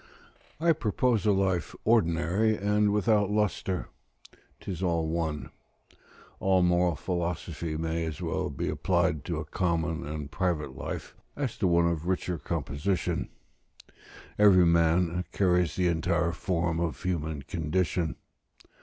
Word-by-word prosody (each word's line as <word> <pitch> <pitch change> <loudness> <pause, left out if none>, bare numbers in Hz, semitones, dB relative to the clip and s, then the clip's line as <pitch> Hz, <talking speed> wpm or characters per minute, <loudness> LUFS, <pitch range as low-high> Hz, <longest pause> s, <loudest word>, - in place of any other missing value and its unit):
I 165 +1 +4
propose 115 -4 0
a - - +6
life 95 -4 0
ordinary 100 +1 +2
and 105 +1 +2
without 105 -1 +2
lustre: 105 -3 -1 0.7
'tis 90 -3 -6
all 85 -3 +1
one; 80 -2 -2 0.9
all 95 -1 +3
moral 90 -1 +3
philosophy 85 -1 -3
may 80 +1 -1
as 80 -1 -5
well 85 -3 -2
be - - -3
applied 90 -5 +1
to 85 -3 -2
a 75 - -4
common 85 0 -1
and 75 -2 -5
private 75 -5 -1
life, - - -6 0.2
as 135 -5 -2
to 95 - +2
one 85 -1 +4
of 85 0 -2
richer 90 -2 -1
composition: 75 +6 -2 1.1
every 95 -4 +7
man 85 +1 +3
carries 90 -5 +2
the 90 - +1
entire 85 0 +1
form 85 -2 -1
of 80 -5 -2
human 80 -5 -2
condition. 80 +1 -1
85 Hz, 125 wpm, -28 LUFS, 80-95 Hz, 1.1 s, every